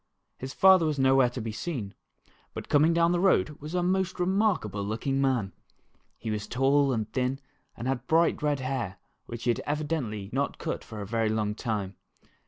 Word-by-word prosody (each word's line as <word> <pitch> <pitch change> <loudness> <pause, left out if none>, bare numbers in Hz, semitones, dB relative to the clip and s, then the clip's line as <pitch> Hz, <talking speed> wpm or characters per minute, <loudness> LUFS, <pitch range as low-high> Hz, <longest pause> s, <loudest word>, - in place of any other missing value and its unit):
His 130 +1 -5
father 190 -2 +5
was 150 -2 -1
nowhere 135 -1 +4
to 125 - -6
be 110 0 -4
seen, 115 - -4 0.6
but - - -7
coming 150 +3 +4
down 170 0 +3
the 175 - +1
road 190 -4 +3
was 155 +4 -6
a 180 - +1
most 190 0 0
remarkable 180 - +1
looking 135 +7 -1
man. 125 -8 0 0.6
He 110 - -4
was 105 -1 -3
tall 135 +4 +2
and 110 -4 -1
thin 130 +1 0 0.4
and 120 - -4
had 130 -1 -2
bright 165 +1 +3
red 145 -2 0
hair 130 -7 -3 0.3
which 120 0 -7
had 120 -1 +1
evidently 145 -10 -2
not 140 +1 -1
been - - -11
cut - - -2
for 110 -3 -8
a - - -4
very 115 +1 0
long 105 -1 0
time. 105 -4 -3
135 Hz, 190 wpm, -28 LUFS, 110-155 Hz, 0.6 s, father